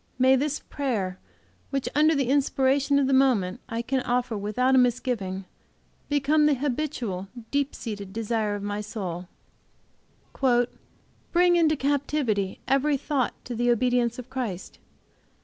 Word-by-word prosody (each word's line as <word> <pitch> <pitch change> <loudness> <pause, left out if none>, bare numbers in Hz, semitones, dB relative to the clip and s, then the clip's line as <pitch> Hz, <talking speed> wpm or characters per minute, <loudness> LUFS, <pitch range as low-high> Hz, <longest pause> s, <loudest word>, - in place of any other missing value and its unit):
May 260 +1 +5
this 290 +2 -1
prayer, 210 -10 -3 0.5
which, 275 -2 -2
under 310 +2 +4
the 270 -3 0
inspiration 275 0 +2
of 280 - +3
the 270 - +1
moment, 250 -9 +3
I 230 +1 -2
can 265 +2 0
offer 245 -2 -1
without 215 +6 +1
a 260 - +6
misgiving, 230 -6 0 0.6
become 295 +1 +3
the 295 - +3
habitual, 250 -8 -3 0.2
deep 285 0 0
seated 205 -4 -6
desire 220 -1 -1
of 205 - -6
my 205 0 -3
soul: 185 -5 -5 2.0
"Bring 350 0 +4
into 320 -2 +4
captivity 275 -8 0
every 275 +2 +2
thought 270 -2 -1
to 245 - -5
the 240 +1 +1
obedience 240 0 +2
of 250 -1 -8
Christ. 225 -9 -5
255 Hz, 135 wpm, -26 LUFS, 215-280 Hz, 2.0 s, a